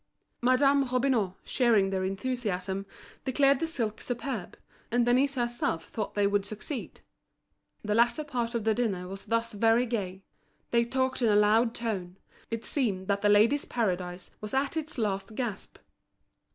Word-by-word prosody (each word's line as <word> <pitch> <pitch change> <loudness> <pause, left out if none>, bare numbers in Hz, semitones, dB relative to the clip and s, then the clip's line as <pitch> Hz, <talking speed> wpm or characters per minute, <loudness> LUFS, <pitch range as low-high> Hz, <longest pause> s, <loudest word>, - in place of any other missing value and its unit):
Madame 275 +3 +4
Robineau, 250 -7 +1
sharing 220 -6 +3
this 190 -1 0
enthusiasm, 195 -2 -2 0.4
declared 275 +1 +3
the 330 - -1
silk 230 -10 -2
superb, 245 -5 -4 0.3
and 240 0 +2
Denise 265 +3 +3
herself 240 -9 -1
thought 215 -2 -4
they 205 -1 +3
would 200 0 +2
succeed. 215 +6 -5 0.8
The 210 0 0
latter 235 +7 +3
part 240 -5 -2
of 230 - -1
the 220 0 +3
dinner 200 -6 -1
was 195 +1 -8
thus 230 0 0
very 225 +3 +3
gay. 195 -5 -3 0.5
They 235 0 +3
talked 260 +1 -1
in 230 - +4
a 205 - +4
loud 220 +3 +4
tone; 190 -6 -3 0.3
it 230 0 -4
seemed 205 -10 0
that 200 0 +1
The 205 - +3
Ladies' 220 +8 +4
Paradise 180 -6 -2
was 210 +3 -4
at 275 +3 0
its 315 -2 -3
last 210 -1 -2
gasp. 225 -5 -4
230 Hz, 155 wpm, -29 LUFS, 200-250 Hz, 0.8 s, Madame